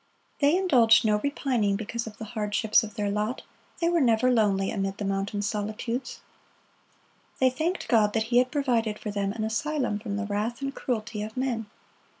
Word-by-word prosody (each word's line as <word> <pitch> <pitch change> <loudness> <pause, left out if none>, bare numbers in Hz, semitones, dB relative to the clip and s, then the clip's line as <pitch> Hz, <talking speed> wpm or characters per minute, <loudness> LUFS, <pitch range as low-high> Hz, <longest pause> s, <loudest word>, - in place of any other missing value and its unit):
They 290 +4 +4
indulged 240 -13 +5
no 210 -1 +3
repining 250 -6 0
because 230 +2 -4
of 210 - -9
the 220 - -6
hardships 215 0 +2
of 215 -2 -8
their 205 -2 -1
lot; 210 +4 -2 0.4
they 335 - +1
were 340 -1 +2
never 250 0 +3
lonely 200 -5 +2
amid 195 -1 -2
the 205 - -4
mountain 195 +1 -2
solitudes. 215 +4 -3 1.2
They 260 -1 +3
thanked 325 +8 -2
God 210 -3 +3
that 225 - +1
He 245 - +7
had 250 0 +2
provided 235 -7 0
for 210 - -5
them 200 -1 -1
an 215 +1 -4
asylum 235 0 -1
from 205 -2 -4
the 210 - -2
wrath 210 +3 -2
and 275 0 -3
cruelty 225 -5 -3
of 220 +3 -6
men. 245 -4 -1
220 Hz, 180 wpm, -27 LUFS, 210-255 Hz, 1.2 s, He